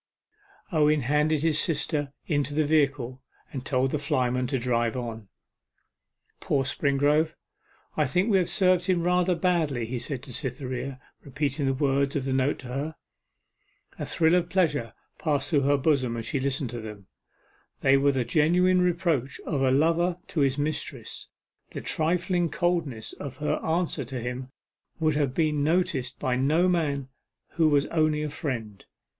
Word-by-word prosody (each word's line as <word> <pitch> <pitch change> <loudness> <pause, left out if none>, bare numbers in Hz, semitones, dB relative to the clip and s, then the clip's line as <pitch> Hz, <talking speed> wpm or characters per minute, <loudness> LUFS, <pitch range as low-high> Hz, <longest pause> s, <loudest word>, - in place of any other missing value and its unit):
Owen 150 -2 +3
handed 150 +3 +1
his 155 -2 +3
sister 150 -3 0
into 145 -1 -1
the 155 0 +2
vehicle, 140 -4 +1 0.3
and 130 -3 -4
told 130 -2 +1
the 150 - -1
flyman 130 -4 0
to 135 +1 0
drive 120 -1 0
on. 115 -4 -6 1.1
'Poor 135 -2 0
Springrove 145 +4 +1 0.6
I 150 -3 +2
think 180 - +1
we 195 - +5
have 180 - 0
served 185 -2 +3
him 180 -3 +2
rather 180 0 +2
badly,' 160 -8 0
he 120 +2 -4
said 125 +1 -4
to 135 -3 -9
Cytherea, 130 +1 -4 0.2
repeating 140 +1 -2
the 135 - +1
words 140 0 +1
of 135 -2 -1
the 135 - -1
note 135 +2 +1
to 130 - -10
her. 145 +5 -3 1.0
A - - -3
thrill 160 0 +2
of 175 -1 +2
pleasure 150 -11 +1 0.3
passed 145 -3 0
through 145 -3 +4
her 140 +1 +3
bosom 130 -5 +1
as 115 - -4
she 135 - -1
listened 135 -2 -1
to 120 -1 -5
them. 105 -3 -9 0.8
They 135 0 +5
were 140 +1 +4
the 130 -3 -1
genuine 180 +7 +3
reproach 170 -7 0
of 140 -4 -1
a 135 - +3
lover 165 +6 +2
to 160 - -2
his 135 -1 +2
mistress; 145 +1 -4 0.4
the - - -5
trifling 175 +2 0
coldness 160 -9 -1
of 135 -2 -8
her 150 - 0
answer 165 -2 0
to 130 +1 -5
him 125 +2 -5 0.5
would 155 -1 +2
have 140 -3 0
been 150 -3 +1
noticed 145 -6 0
by 125 -1 0
no 155 +7 +3
man 145 -7 0 0.4
who 160 -2 +2
was 145 -1 +3
only 155 -2 +2
a 150 - -3
friend. 120 - -5
145 Hz, 165 wpm, -26 LUFS, 130-160 Hz, 1.1 s, we